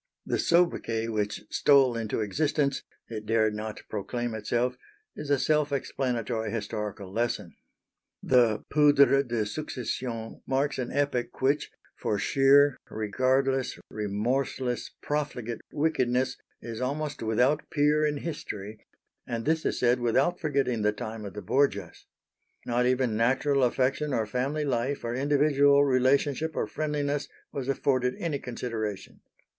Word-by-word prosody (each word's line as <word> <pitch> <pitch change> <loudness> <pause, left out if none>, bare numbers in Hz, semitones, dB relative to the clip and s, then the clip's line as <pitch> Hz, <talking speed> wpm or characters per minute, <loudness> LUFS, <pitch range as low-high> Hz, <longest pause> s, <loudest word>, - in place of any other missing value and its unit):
The - - -1
soubriquet 115 -10 +2
which 105 -1 -2
stole 135 -4 +4
into 115 -1 -2
existence 140 +5 0 0.3
it 110 -2 -7
dared 110 -1 +2
not 105 0 -6
proclaim 115 +3 -3
itself 120 +3 -1 0.4
is 150 - -7
a 145 - +4
self 150 0 +1
explanatory 120 -5 -2
historical 105 -3 -4
lesson. 110 -6 -1 0.7
The 120 -4 +3
poudre 145 -2 +6
de 120 -5 -1
succession 120 -2 -4
marks 135 +2 0
an 125 - -3
epoch 140 -3 -1
which, 140 +3 +1 0.3
for 105 - -1
sheer, 140 +5 +4
regardless, 130 +5 0
remorseless, 120 +4 -1
profligate 130 -6 -3
wickedness 130 -5 +1 0.3
is 115 0 -6
almost 145 +3 -2
without 125 +7 +1
peer 150 +1 +2
in 150 -1 +1
history, 110 - -6 0.5
and 115 -1 -3
this 160 +1 +1
is - - -1
said 125 +1 +3
without 135 +9 +1
forgetting 140 -7 0
the 105 0 +3
time 110 0 -6
of 100 - -8
the 105 - -6
Borgias. 140 +9 0 0.6
Not 125 +1 +1
even 125 -3 +1
natural 135 +5 +2
affection 130 +3 +1
or 110 - +1
family 135 +7 -1
life 135 +1 -1
or 115 0 -2
individual 140 +1 +4
relationship 140 +4 +2
or - - 0
friendliness 145 -2 -2 0.2
was 135 -2 -4
afforded 130 -2 +1
any 155 -5 -2
consideration. 115 -5 -5
130 Hz, 130 wpm, -28 LUFS, 115-145 Hz, 0.7 s, poudre